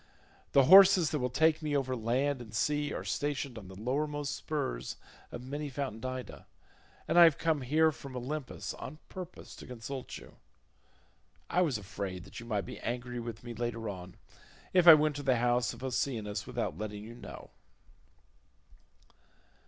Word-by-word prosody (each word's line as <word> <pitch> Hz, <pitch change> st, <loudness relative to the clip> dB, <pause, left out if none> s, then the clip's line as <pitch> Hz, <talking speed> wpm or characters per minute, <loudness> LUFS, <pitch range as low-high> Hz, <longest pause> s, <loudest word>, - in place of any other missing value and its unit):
The 140 Hz, -, +7 dB
horses 190 Hz, +1 st, +8 dB
that 150 Hz, -, 0 dB
will 125 Hz, -1 st, 0 dB
take 160 Hz, +5 st, +3 dB
me 150 Hz, -2 st, 0 dB
over 130 Hz, -2 st, -1 dB
land 125 Hz, +4 st, 0 dB
and 110 Hz, -2 st, -9 dB
sea 145 Hz, +5 st, 0 dB
are -, -, -4 dB
stationed 145 Hz, -3 st, -2 dB
on 105 Hz, -5 st, -9 dB
the 95 Hz, -, -11 dB
lowermost 145 Hz, +4 st, -1 dB
spurs 65 Hz, -, -3 dB, 0.3 s
of 120 Hz, -, -7 dB
many 145 Hz, +3 st, -4 dB
fountained 130 Hz, -4 st, -4 dB
Ida, 130 Hz, 0 st, -7 dB, 0.6 s
and 175 Hz, -, +4 dB
I -, -, +11 dB
have 160 Hz, -4 st, +4 dB
come 160 Hz, -3 st, +1 dB
here 155 Hz, +5 st, +3 dB
from 135 Hz, -3 st, -9 dB
Olympus 135 Hz, +3 st, -4 dB
on 155 Hz, -, -8 dB
purpose 180 Hz, -1 st, -9 dB
to -, -, -11 dB
consult 125 Hz, +2 st, -6 dB
you. -, -, -14 dB, 1.1 s
I 180 Hz, -, +3 dB
was 150 Hz, -9 st, +1 dB
afraid 95 Hz, 0 st, -6 dB
you 115 Hz, -, -10 dB
might 105 Hz, -3 st, -1 dB
be -, -, -8 dB
angry 125 Hz, +1 st, -4 dB
with 115 Hz, -1 st, -6 dB
me 120 Hz, -1 st, -6 dB
later 115 Hz, -1 st, -3 dB
on, 90 Hz, -2 st, -8 dB, 0.6 s
if 180 Hz, -2 st, +4 dB
I 165 Hz, -, +13 dB
went 150 Hz, -1 st, +1 dB
to -, -, -4 dB
the 130 Hz, -2 st, +3 dB
house 120 Hz, +1 st, +2 dB
of -, -, -11 dB
Oceanus 120 Hz, -5 st, -2 dB
without 80 Hz, -, -3 dB
letting 105 Hz, -1 st, -5 dB
you 115 Hz, +2 st, -9 dB
know." 120 Hz, -, -10 dB
130 Hz, 170 wpm, -31 LUFS, 115-150 Hz, 1.1 s, I